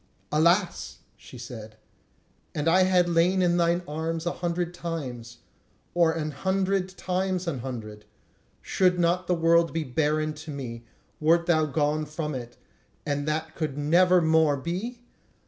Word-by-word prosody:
"Alas!" 170 +5 +1
she - - -13
said, 110 -3 -9 0.8
"and 150 +1 -1
had 185 +1 +4
I - - -6
lain 175 +2 +3
in 175 -1 +2
thine 170 +1 +2
arms 160 +2 -3
an 175 - 0
hundred 175 0 -2
times, 125 -9 -6 0.5
or 170 -2 +4
an 155 -1 -3
hundred 190 +4 0
times 185 0 -1
an 145 -6 -2
hundred, 110 -4 -7 0.6
should 180 -1 +2
not 175 +1 +1
the 180 - +2
world 165 0 +3
be 165 -1 -1
barren 155 +3 0
to 155 +1 -11
me, 120 -5 -6 0.3
wert 165 +2 +3
thou 160 -3 +3
gone 150 +2 0
from 150 0 -4
it, 120 -2 -7 0.5
and 145 0 -2
that 155 +1 -2
could 155 -4 -3
never 175 +5 +4
more 160 -2 +3
be? 190 - -4
160 Hz, 145 wpm, -26 LUFS, 145-175 Hz, 0.8 s, had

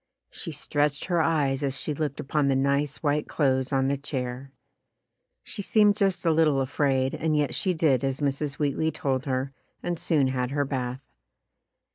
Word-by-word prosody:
She 165 - -6
stretched 145 0 -1
her 175 -3 +1
eyes 145 -4 +1
as 135 -2 -2
she 150 - -2
looked 145 -2 -3
upon 145 +1 0
the 135 - +2
nice 140 +2 0
white 150 0 +1
clothes 130 -3 +1
on 135 -1 +2
the 140 +1 0
chair. 130 -1 -5 0.9
She - - -5
seemed 210 0 +4
just 195 -3 +1
a 165 - +4
little 155 -3 +3
afraid 135 -1 +1
and 155 -1 0
yet 145 -4 +1
she 180 +7 +1
did 145 -5 +2
as 135 0 -1
Mrs. 140 0 -1
Wheatley 150 +2 0
told 135 -6 -2
her 130 +1 -1 0.3
and 175 -2 -2
soon 145 -5 +2
had 125 -1 -1
her 145 +1 0
bath. 130 -1 -3
140 Hz, 175 wpm, -26 LUFS, 135-155 Hz, 0.9 s, seemed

